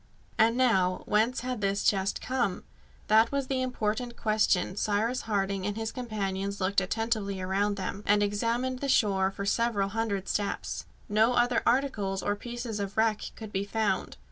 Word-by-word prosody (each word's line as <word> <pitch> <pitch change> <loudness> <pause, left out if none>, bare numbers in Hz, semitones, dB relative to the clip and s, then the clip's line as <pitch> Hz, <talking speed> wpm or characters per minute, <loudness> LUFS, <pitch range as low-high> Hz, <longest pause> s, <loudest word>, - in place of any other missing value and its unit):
And 230 +2 +4
now, 190 -8 +2
whence 225 +4 +2
had 250 -3 -3
this 200 0 0
chest 195 -1 +1
come? 240 -8 -1 0.4
That 220 +2 +4
was 280 -1 0
the 260 0 -1
important 240 -1 -2
question 210 -4 +1
Cyrus 215 +5 0
Harding 195 -2 0
and 205 +1 -3
his 225 0 -3
companions 200 -4 -3
looked 195 +1 +2
attentively 210 0 -1
around 195 +2 0
them, 195 +1 -4
and 205 0 +4
examined 235 +5 -1
the 280 - -2
shore 195 -6 +3
for 200 +1 -5
several 205 -2 +1
hundred 200 -2 -2
steps. 205 -1 -2 0.2
No 220 +4 +3
other 240 -1 +3
articles 220 -7 +1
or 205 - 0
pieces 235 -1 -5
of 200 0 -4
wreck 220 -1 +2
could 220 -2 -8
be 195 0 -1
found. 215 +1 -1
210 Hz, 165 wpm, -29 LUFS, 200-235 Hz, 0.4 s, And